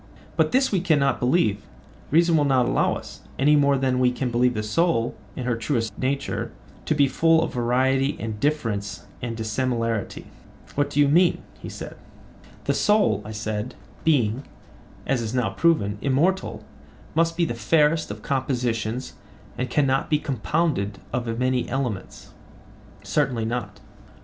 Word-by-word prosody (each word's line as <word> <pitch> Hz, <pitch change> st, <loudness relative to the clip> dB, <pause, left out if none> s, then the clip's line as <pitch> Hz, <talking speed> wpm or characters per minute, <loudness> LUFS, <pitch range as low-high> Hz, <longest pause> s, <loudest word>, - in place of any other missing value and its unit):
But -, -, +2 dB
this 265 Hz, +1 st, +3 dB
we 190 Hz, -4 st, +1 dB
cannot 150 Hz, -6 st, +2 dB
believe—reason 150 Hz, -, 0 dB
will 150 Hz, -, +4 dB
not 130 Hz, -3 st, +3 dB
allow -, -, +1 dB
us—any 145 Hz, +3 st, -1 dB
more 140 Hz, -1 st, +4 dB
than 130 Hz, -1 st, +1 dB
we 125 Hz, -1 st, +4 dB
can 125 Hz, 0 st, -2 dB
believe 125 Hz, +1 st, +2 dB
the 105 Hz, -, -2 dB
soul, 120 Hz, +1 st, +1 dB, 0.2 s
in 130 Hz, -, -4 dB
her 125 Hz, -2 st, +1 dB
truest 115 Hz, -3 st, -2 dB
nature, 140 Hz, +2 st, -2 dB, 0.4 s
to 155 Hz, -, +2 dB
be 140 Hz, -1 st, +4 dB
full 165 Hz, +3 st, +3 dB
of -, -, -4 dB
variety 130 Hz, +3 st, +1 dB
and 110 Hz, -1 st, -4 dB
difference 105 Hz, -, -1 dB, 0.2 s
and 115 Hz, -2 st, -4 dB
dissimilarity. 115 Hz, -1 st, -2 dB, 0.5 s
What 145 Hz, 0 st, 0 dB
do 145 Hz, -, -2 dB
you 145 Hz, -, +6 dB
mean? 170 Hz, +5 st, +3 dB, 0.2 s
he -, -, -8 dB
said. -, -, -8 dB, 0.7 s
The -, -, +1 dB
soul, 120 Hz, -, +3 dB
I 105 Hz, -, -8 dB
said, 110 Hz, +2 st, -4 dB, 0.3 s
being, 130 Hz, -5 st, +2 dB, 0.6 s
as 135 Hz, -3 st, 0 dB
is 115 Hz, +2 st, -3 dB
now 120 Hz, -6 st, +1 dB
proven, 105 Hz, -5 st, +1 dB
immortal, 160 Hz, +8 st, 0 dB, 0.5 s
must 165 Hz, +1 st, +1 dB
be 170 Hz, -, +3 dB
the 135 Hz, -, -2 dB
fairest 150 Hz, +7 st, +2 dB
of 105 Hz, +1 st, -7 dB
compositions 125 Hz, -3 st, -2 dB, 0.4 s
and 125 Hz, 0 st, -3 dB
cannot 135 Hz, 0 st, +1 dB
be 150 Hz, -, +3 dB
compounded 135 Hz, -6 st, -1 dB, 0.2 s
of 120 Hz, -1 st, -2 dB
many 125 Hz, 0 st, 0 dB
elements? 125 Hz, -7 st, -4 dB, 0.7 s
Certainly 125 Hz, -6 st, 0 dB
not. 120 Hz, +2 st, -4 dB
130 Hz, 150 wpm, -24 LUFS, 115-150 Hz, 0.7 s, you